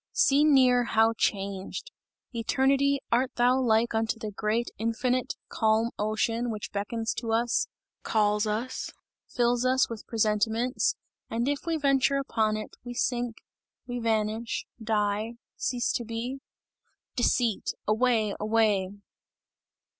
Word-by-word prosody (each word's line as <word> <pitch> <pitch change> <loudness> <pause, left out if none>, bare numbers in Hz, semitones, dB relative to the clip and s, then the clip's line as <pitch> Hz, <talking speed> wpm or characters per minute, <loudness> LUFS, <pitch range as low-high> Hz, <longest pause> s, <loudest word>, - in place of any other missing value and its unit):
Seen 290 +1 +4
near, 250 -2 +5
how 225 0 +3
changed! 195 - -2 0.4
Eternity, 275 +4 +2
art 250 +2 +1
thou 250 +2 +3
like 235 -1 +2
unto 225 0 0
the 215 -2 -5
great 215 +4 -1
infinite, 245 +3 0
calm 220 +1 +1
ocean, 225 +3 0
which 215 -2 -5
beckons 225 +3 -2
to 230 -2 -4
us, 235 +1 +1 0.3
calls 210 0 +1
us, 225 +5 -3 0.4
fills 240 0 +1
us 255 -1 +2
with 225 -2 -7
presentiments, 225 +3 +1 0.3
and 235 +2 -1
if 285 +3 -2
we 330 -1 +1
venture 275 -1 +3
upon 220 -5 0
it, 215 - -8
we 245 0 -7
sink, 240 -2 -1 0.5
we 245 0 -4
vanish 220 0 -1 0.2
die 215 +1 0 0.2
cease 245 -1 -1
to 240 - -1
be? 230 +4 -4 0.8
"Deceit! 240 -3 +1
away! 220 -1 +2
away!" 210 -3 +2
230 Hz, 125 wpm, -28 LUFS, 215-250 Hz, 0.8 s, near